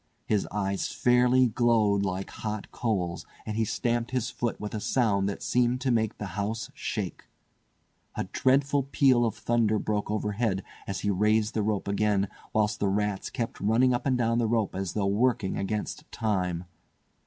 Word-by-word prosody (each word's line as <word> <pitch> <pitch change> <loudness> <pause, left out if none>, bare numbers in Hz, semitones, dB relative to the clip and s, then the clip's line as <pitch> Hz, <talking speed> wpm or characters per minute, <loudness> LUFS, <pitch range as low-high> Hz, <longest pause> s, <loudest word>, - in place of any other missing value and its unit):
His 105 -2 +1
eyes 100 -1 -1
fairly 125 +1 +4
glowed 110 -4 +3
like 95 -1 -2
hot 110 -1 -5
coals, 90 -7 -1 0.2
and 110 - -3
he 110 - +2
stamped 120 +2 -1
his 125 -3 -1
foot 120 -1 -2
with 105 0 -5
a 110 - -2
sound 100 -4 +1
that 100 - -5
seemed 125 0 +2
to 130 - +1
make 110 -2 +1
the 105 - -4
house 105 +3 -3
shake. - - -4 0.9
A - - -1
dreadful 140 +2 +2
peal 135 -2 +3
of 115 -1 -1
thunder 115 -2 +1
broke 105 -1 -1
overhead 105 -2 -1 0.2
as 100 - -3
he 105 - +1
raised 105 +2 +2
the 110 - 0
rope 105 -1 -1
again, 100 -1 +1 0.2
whilst 105 0 +1
the 100 - +1
rats 105 0 -1
kept 120 -4 -4
running 120 +5 +3
up 120 - -1
and 130 -2 +2
down 115 -1 +1
the 115 - +2
rope 110 -3 +1
as 95 -2 -3
though 105 -2 0
working 105 0 +1
against 105 +2 -3
time. 90 -6 -1
110 Hz, 175 wpm, -28 LUFS, 100-120 Hz, 0.9 s, fairly